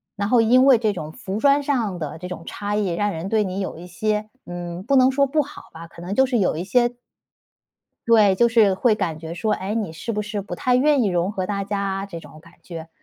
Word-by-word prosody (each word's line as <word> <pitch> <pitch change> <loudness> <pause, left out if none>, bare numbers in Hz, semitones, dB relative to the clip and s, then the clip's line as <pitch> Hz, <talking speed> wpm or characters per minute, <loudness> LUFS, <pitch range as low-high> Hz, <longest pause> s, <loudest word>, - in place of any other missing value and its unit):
然 200 -1 -2
后 245 -1 +5
因 250 +4 +5
为 270 -3 +7
这 220 -2 0
种 155 -5 -6
服 190 +5 -6
装 280 +2 +3
上 230 -11 -1
的 155 0 -5
这 180 - -7
种 180 -2 -7
差 205 0 -4
异， 210 -3 0
让 205 +5 -1
人 165 +1 -5
对 215 +1 +2
你 190 -1 -4
有 190 -4 -4
一 175 +2 -10
些 215 +4 -2 0.2
嗯， 175 0 -6
不 275 +6 +1
能 260 0 +5
说 280 +1 +2
不 300 +3 +1
好 285 - -9
吧， 165 +1 -10
可 170 - -14
能 185 +3 -4
就 265 - +5
是 255 -2 0
有 195 -7 +1
一 170 - -3
些 240 +4 +2 1.1
对， 215 -4 +5
就 235 +5 +3
是 220 -4 +4
会 220 +3 +2
感 165 -6 -3
觉 165 +1 -7
说： 215 +4 -1
“诶， 200 +3 -4
你 210 -8 -2
是 195 +8 -5
不 210 -1 -2
是 210 0 -4
不 195 -2 -6
太 250 +7 0
愿 285 +1 +3
意 210 - +2
融 180 0 0
合 185 -3 -3
大 200 0 -2
家 200 0 -3
啊？” 195 0 -2
这 170 -4 -8
种 155 - -14
感 170 +1 -19
觉。 165 -2 -9
205 Hz, 275 characters per minute, -22 LUFS, 175-230 Hz, 1.1 s, 为